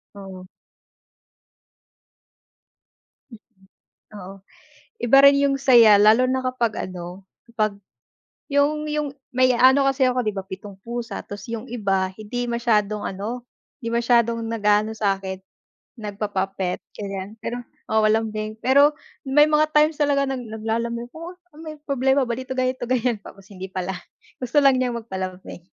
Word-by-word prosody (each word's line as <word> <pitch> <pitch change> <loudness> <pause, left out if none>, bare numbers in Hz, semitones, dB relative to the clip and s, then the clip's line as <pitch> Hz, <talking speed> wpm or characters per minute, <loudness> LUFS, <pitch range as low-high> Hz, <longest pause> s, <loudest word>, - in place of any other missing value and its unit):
Oo. 190 -2 -10 2.8
Mm. 225 -3 -13 0.8
Oo. 190 +1 -9 0.7
Iba 240 +3 +5
rin 280 0 +7
yung 280 -1 +2
saya, 235 -6 +6
lalo 220 +5 +5
na 260 0 -1
kapag 240 -4 -1
ano, 180 +1 -9 0.2
kapag 215 -3 -1 0.7
yung 300 +2 +1
yung 300 -2 -2 0.2
may 255 0 +3
ano 265 +3 +5
kasi 270 0 0
ako, 250 -2 -2
'di 210 - -1
ba 195 - -4
7 195 +1 -9
pusa, 235 -2 -5
tas 205 -1 -9
yung 230 +1 -6
iba 195 -5 0
hindi 240 +3 -4
masyadong 215 -3 0
ano, 230 +6 -5 0.3
hindi 230 -4 -4
masyadong 235 -1 +2
nag-aano 215 -1 +1
sa 200 -2 +1
akin 190 -1 -6 0.6
nagpapa-pet, 195 -3 -3 0.2
ganyan. 200 +1 -6
Pero 245 +1 -4 0.3
oo, 220 0 +3
lambing. 215 0 -1
Pero 280 +3 +5 0.3
may 295 +2 +5
mga 305 0 +3
times 300 0 +3
talaga 285 -1 +2
nag 265 -1 -3
naglalambing, 230 +2 -3
oh, 335 +3 -9
oh, 360 -4 -21
may 310 -1 -8
problema 270 -1 +1
ba 235 - -2
dito, 260 0 -5
ganito, 255 -1 -1
ganyan, 250 -2 +1
tapos 195 -1 -14
hindi 190 0 -7
pala, 185 0 -4 0.5
gusto 255 +3 +1
lang 270 -2 +5
niyang 245 -2 -1
magpalambing. 185 -4 -7
235 Hz, 140 wpm, -22 LUFS, 205-260 Hz, 2.8 s, rin